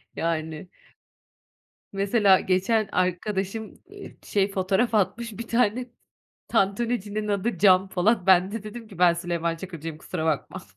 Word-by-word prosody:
Yani. 160 0 -3 1.2
Mesela 200 0 +3
geçen 200 +3 +1
arkadaşım, 190 +4 -1 0.3
ııı, 405 -1 -10
şey, 200 -1 0
fotoğraf 195 +5 0
atmış 230 +3 0
1 230 - -6
tane, 240 +1 +1 0.6
tantunicinin 210 0 0
adı, 200 -1 -1
Can 190 -1 +5
Polat. 195 +1 +1
Ben 185 +1 +5
de 225 -2 -4
dedim 215 +1 -9
ki 195 -5 -13
"Ben 175 -1 +5
Süleyman 170 -1 -2
Çakır'cıyım, 165 -3 -7
kusura 160 - -5
bakma." 155 -3 -2
195 Hz, 130 wpm, -25 LUFS, 180-220 Hz, 1.2 s, Can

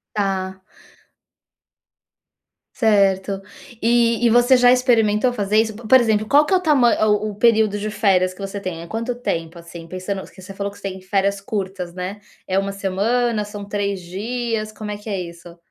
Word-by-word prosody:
Tá. 190 -2 -2 2.1
Certo. 195 -3 +2 0.4
E 235 0 +2
e - - +4
você 245 +2 +5
já 245 0 +6
experimentou 245 -2 +3
fazer 210 -1 0
isso? 220 -1 +1
Po 230 -1 -10
por 260 +3 +7
exemplo, 215 -2 +1
qual 290 +5 +4
que 380 - +1
é - - +6
o - - +1
tama 255 -8 +3
o 210 0 +1
o - - -11
período 220 -2 +3
de 210 +1 -3
férias 190 -4 +2
que 185 - -16
você 195 +1 -5
tem? 180 -4 -5
É - - -9
quanto 230 +5 -3
tempo, 170 -8 -4
assim, 170 0 -11
pensando 185 +2 -5
que - - -15
você 195 +1 -10
falou 200 0 -4
que - - -15
você 195 - -4
tem 190 0 -8
férias 200 +1 0
curtas, 190 -3 -4
né? 185 +3 -5 0.3
É 190 +1 +1
1 195 0 -1
semana, 210 +4 0
são 205 -1 -8
3 200 -2 -2
dias, 215 +4 -4
como 215 -1 -7
é 205 - -4
que 210 +1 -9
é 195 -2 -2
isso? 170 0 -10
205 Hz, 190 wpm, -21 LUFS, 190-225 Hz, 2.1 s, por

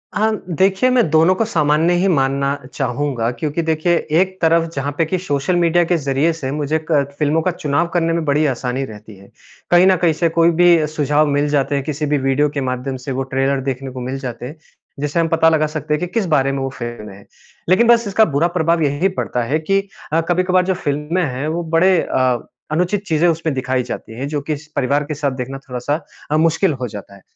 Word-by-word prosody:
हाँ, 220 +1 +2 0.2
देखिए 190 - +2
मैं 240 -10 +3
दोनों 160 +4 +4
को 225 - 0
सामान्य 160 -3 +2
ही 185 +3 +2
मानना 140 -3 +1 0.2
चाहूँगा 130 -3 -1
क्योंकि 155 +5 -3
देखिए 160 +2 +1 0.3
एक 190 0 -2
तरफ 165 0 +4
जहाँ 140 +1 -2
पे 165 - +2
कि 185 +4 -1
सोशल 160 0 -1
मीडिया 175 0 +3
के 175 - +4
ज़रिये 140 +2 +1
से 135 -5 -5
मुझे 150 +2 -1
क 145 -3 +3 0.2
फ़िल्मों 150 +2 +2
का 185 - 0
चुनाव 155 0 -1
करने 165 -1 +1
में 165 0 -1
बड़ी 150 +1 +2
आसानी 130 -1 -2
रहती 105 -3 -12
है। 100 +1 -17 0.4
कहीं 175 +1 +6
न 190 - +5
कहीं 170 -1 +2
से 165 +2 +1
कोई 165 +1 +3
भी 170 -1 +4
सुझाव 150 0 +1
मिल 145 +1 +1
जाते 145 -1 +1
हैं 140 - -1
किसी 150 +1 -3
भी 150 0 +1
वीडियो 135 +2 +1
के 140 -1 -4
माध्यम 130 +1 -3
से 135 +2 -6
वो 130 +1 -2
ट्रेलर 135 +1 -1
देखने 135 0 -4
को 130 - -7
मिल 130 +2 -4
जाते 125 -3 -6
हैं। 145 +6 -8 0.4
जिसे 145 +3 -1
हम 165 - +2
पता 165 0 +3
लगा 155 -1 +2
सकते 150 0 -3
हैं 150 - 0
कि 180 - -2
किस 225 -4 +1
बारे 140 -5 +2
में 135 - -3
वो 135 - -2
फ़िल्म 120 -4 -7
है। 100 +1 -14 0.4
लेकिन 210 +6 +4
बस 235 -2 +4
इसका 210 +2 +4
बुरा 160 +4 +3
प्रभाव 165 0 +2
यही 145 +6 +1
पड़ता 125 -9 -2
है 150 +7 0
कि 195 +5 +1 0.3
अ, 165 - +3
कभी-कभार 180 +1 +2
जो 190 - +1
फिल्में 150 +2 -2
हैं 135 -1 -3
वो 165 +2 -2
बड़े 170 +2 +3
अ, 125 -2 0 0.2
अनुचित 180 +5 0
चीज़ें 160 +1 +2
उसमें 165 -2 0
दिखाई 130 -1 -1
जाती 115 -1 -7
हैं 140 - -3
जो 145 -1 -3
कि 150 +1 -3
स 150 +1 -15
परिवार 140 +2 +1
के 150 +1 -5
साथ 140 -1 -1
देखना 130 +1 -5
थोड़ा-सा 130 +6 -2 0.3
अ, 155 - +3
मुश्किल 165 +2 +2
हो 125 - -1
जाता 100 -1 -10
है। 100 - -17
150 Hz, 230 wpm, -18 LUFS, 135-170 Hz, 0.4 s, कहीं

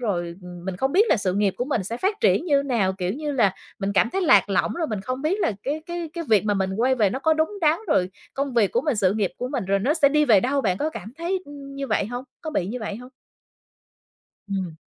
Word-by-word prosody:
rồi, 175 -7 -2
ừm, 175 -1 -10
mình 190 -1 -4
không 265 +7 0
biết 415 +5 +5
là - - +4
sự 190 -3 -1
nghiệp 200 -1 +1
của 245 - -1
mình 250 -8 -1
sẽ 230 +5 -3
phát 400 - -1
triển - - +3
như 285 -5 +3
nào. 230 -9 +1
Kiểu 185 -1 -2
như 295 +4 -3
là, 215 -8 +2 0.2
mình 195 0 -2
cảm 215 +4 +3
thấy 385 - -1
lạc 205 - +5
lõng, 195 - +1
rồi 335 -2 -1
mình 215 -6 -3
không 255 +6 -4
biết 360 +7 0
là 300 - +1
cái 295 +5 -3
cái 345 -2 -5
cái 335 0 -4
việc 215 -3 +4
mà 210 -1 +1
mình 190 -1 0
quay 255 +4 +3
về 215 -6 +2
nó 260 - -3
có 315 +3 +2
đúng 315 +6 0
đắn, 315 0 +3
rồi 185 - +2 0.2
công 275 0 -2
việc 215 -5 +3
của 240 - +2
mình, 290 -3 0
sự 195 -2 +3
nghiệp 205 -4 0
của 250 - -3
mình 260 -6 -2
rồi 195 +1 +1
nó 265 +10 +1
sẽ 290 -4 +5
đi 300 +1 +3
về 220 -8 +5
đâu. 275 +5 +1
Bạn 190 -7 0
có 310 - -1
cảm 215 - -8
thấy, 360 +3 -1
ừm, 280 -1 -10
như 275 0 -4
vậy 200 - 0
hông? 245 +3 -5 0.2
Có 315 - -5
bị 240 - -1
như 235 +6 -4
vậy 205 -2 -4
hông? 250 +2 -11 1.4
Ừm. 190 -4 -3
245 Hz, 280 wpm, -24 LUFS, 195-300 Hz, 1.4 s, biết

